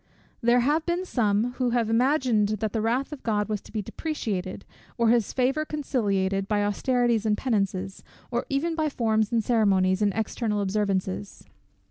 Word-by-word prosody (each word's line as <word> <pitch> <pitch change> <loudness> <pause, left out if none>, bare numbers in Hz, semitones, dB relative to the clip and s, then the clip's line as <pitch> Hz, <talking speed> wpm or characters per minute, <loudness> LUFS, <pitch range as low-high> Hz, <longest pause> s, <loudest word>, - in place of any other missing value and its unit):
There 240 +1 +4
have 300 +6 +2
been 350 +2 0
some 225 - +1
who 250 -1 +2
have 230 -2 +1
imagined 240 -2 +2
that 215 0 -3
the 220 - 0
wrath 245 +6 0
of 290 - -9
God 210 -2 0
was 215 -2 -2
to - - -16
be 215 -2 -3
deprecated, 200 - -4 0.3
or 235 -2 +3
his 235 -3 +2
favour 270 +4 +1
conciliated, 200 -10 -1
by 205 -1 +1
austerities 240 +1 +1
and 210 -1 +2
penances, 195 -5 -2 0.3
or 240 0 -2
even 295 +5 0
by 315 -1 0
forms 220 -4 0
and 230 -2 +1
ceremonies, 195 -4 +2
and 205 -1 +3
external 220 -1 -1
observances. 190 - -2
225 Hz, 165 wpm, -26 LUFS, 205-255 Hz, 0.3 s, There